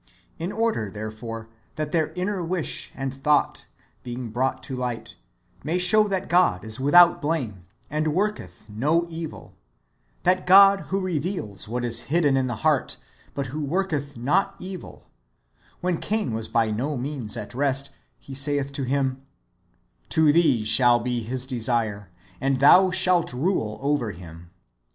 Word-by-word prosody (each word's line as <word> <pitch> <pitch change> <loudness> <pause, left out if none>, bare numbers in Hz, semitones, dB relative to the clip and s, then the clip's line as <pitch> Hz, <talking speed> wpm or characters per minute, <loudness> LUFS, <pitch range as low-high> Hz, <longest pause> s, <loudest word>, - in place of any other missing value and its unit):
"^ - - -41 0.4
In 170 +4 -3
order, 220 - -1
therefore, 110 +2 -7 0.3
that 155 -1 -3
their 160 -3 0
inner 185 0 -2
wish 170 -1 -1
and 135 0 -4
thought, 145 +2 0 0.3
being 120 -1 -6
brought 130 +4 -1
to 135 - -5
light, 125 -2 -5 0.5
may 160 +5 -1
show 210 +4 +4
that 190 -2 -2
God 175 - +3
is 110 +3 -5
without 175 +5 +6
blame, 120 - -3 0.2
and 155 +1 -1
w^orketh 155 - -2
no 145 +11 0
evil 165 -1 -7 0.4
— - - -41
that 185 0 +1
God 195 +1 +8
who 195 - 0
reveals 165 - -3
what 120 +2 -3
is 115 -1 +1
hidden 150 -3 +3
[in 130 -1 +1
the 120 - -3
heart], 150 -4 +1 0.4
but 140 - -2
who 155 0 -3
worketh 145 -4 -2
not 185 +11 +1
evil 185 -1 -9 0.4
— - - -35
when 180 -2 -1
Cain 210 - -2
was 110 0 -2
by 115 -2 +1
no 135 +7 -2
means 125 -4 -4
at 105 - -7
rest, 140 +1 -1 0.3
He 135 - -11
saith 140 0 -1
to 140 0 -4
him: 135 0 -1 0.5
" - - -41
To 155 -2 +5
thee 150 -10 +3
shall 120 +1 +6
be 120 0 -2
his 125 +3 -3
desire, 115 -6 -2 0.3
and 135 -1 +1
thou 185 +7 +7
shalt 185 -5 +1
rule 125 - -1
over 140 -7 0
him." 85 -1 -12
140 Hz, 160 wpm, -24 LUFS, 120-175 Hz, 0.5 s, God